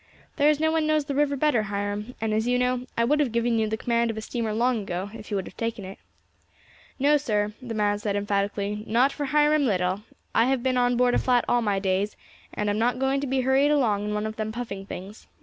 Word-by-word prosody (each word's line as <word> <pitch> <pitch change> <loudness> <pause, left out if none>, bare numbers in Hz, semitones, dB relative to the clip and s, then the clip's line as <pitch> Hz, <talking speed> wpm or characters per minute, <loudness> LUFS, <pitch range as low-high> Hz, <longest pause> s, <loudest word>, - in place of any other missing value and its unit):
"There 290 0 +5
is 300 -1 +2
no 315 0 +2
one 320 -1 +1
knows 310 -1 +2
the 285 - -3
river 285 0 +1
better, 280 -5 +2
Hiram; 205 +3 -4
and, 220 -1 -1
as 220 +2 0
you 250 0 +2
know, 250 0 0
I 230 - +3
would 295 +6 +2
have 280 -5 +1
given 235 0 +1
you 220 - +1
the 220 - -2
command 235 0 +1
of 225 - -4
a - - -3
steamer 225 0 -3
long 235 +1 +1
ago 195 +1 -4
if 220 -2 -10
you 205 - -1
would 190 - -3
have - - -11
taken 230 -3 -3
it." 190 +1 -9 1.0
"No, 290 +2 +4
sir," 210 -7 -1
the 235 -3 -6
man 205 -1 +1
said 205 -1 -2
emphatically, 205 +1 -1
"not 245 +5 +3
for 290 - -4
Hiram 295 0 +3
Little. 185 -1 0 0.3
I 230 - +4
have 260 -1 0
been 260 -1 +1
on 245 -1 +2
board 250 0 +3
a - - +3
flat 250 -2 +2
all 240 - +2
my 205 -3 0
days, 195 +1 0 0.4
and 210 - -3
am 205 +1 0
not 245 +2 +1
going 270 +1 0
to 280 - -2
be 265 0 +1
hurried 265 +3 +3
along 230 -9 +2
in 210 0 -2
one 210 0 -1
of 220 0 -5
them 215 0 -2
puffing 210 -4 -6
things. 200 +4 -9
230 Hz, 255 wpm, -25 LUFS, 210-265 Hz, 1.0 s, There